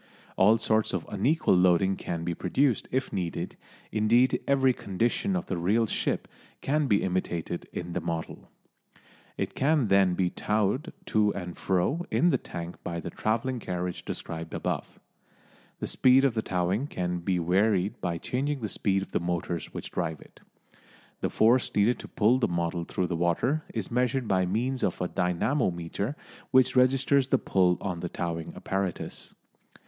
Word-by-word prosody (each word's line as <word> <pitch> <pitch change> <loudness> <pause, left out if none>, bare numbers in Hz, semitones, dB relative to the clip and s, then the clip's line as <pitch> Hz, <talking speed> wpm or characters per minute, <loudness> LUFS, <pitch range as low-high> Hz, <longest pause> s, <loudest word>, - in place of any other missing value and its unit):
All 105 +4 +5
sorts 110 -2 +1
of 90 -4 -2
unequal 130 +11 +2
loading 90 +1 +4
can 85 -3 -4
be 85 0 -1
produced 125 - +1
if 130 +1 -1
needed, 90 -3 -3 0.4
indeed 115 +4 +3
every 135 -2 +4
condition 120 - -1
of 180 - -2
the 95 - -3
real 105 +7 +2
ship - - -1 0.3
can 150 +1 +1
be 100 -4 +3
imitated 85 -2 -2
in 85 0 -5
the - - -2
model. 80 -1 -5 0.9
It - - -2
can 140 -5 +2
then 95 -2 +4
be 90 -1 +1
towed 110 - 0
to 105 - +2
and 90 -3 -5
fro 100 - 0
in 175 - +3
the - - +2
tank 85 0 -7
by 85 -1 -3
the - - -6
travelling 115 +3 -1
carriage 90 -3 -4
described 80 0 -6
above. - - -3 0.8
The - - -3
speed 130 +1 +4
of 135 - +2
towing 95 +8 0
can 90 -7 -2
be 90 +1 0
varied 95 +3 +1
by 85 -1 -1
changing 135 - -2
the 110 - -2
speed 95 -1 0
of - - -11
the - - +1
motors 85 -1 -3
which - - -7
drive 80 -2 -2
it. - - -17 0.8
The - - -1
force 120 +3 +3
needed 105 +4 +3
to - - -8
pull 115 +5 +3
the - - +2
model 85 0 -2
through 90 - -1
the 90 - -2
water 85 - +1
is 110 -5 -4
measured 125 0 +1
by 95 -2 +2
means 125 +7 -1
of - - 0
a 90 - 0
dynamometer 90 - -1 0.3
which 130 0 +4
registers 130 +1 +4
the - - +3
pull 90 -2 +2
on 90 -4 -3
the 90 - -4
towing 85 -2 -4
apparatus. 95 -2 -4
100 Hz, 165 wpm, -28 LUFS, 90-125 Hz, 0.9 s, All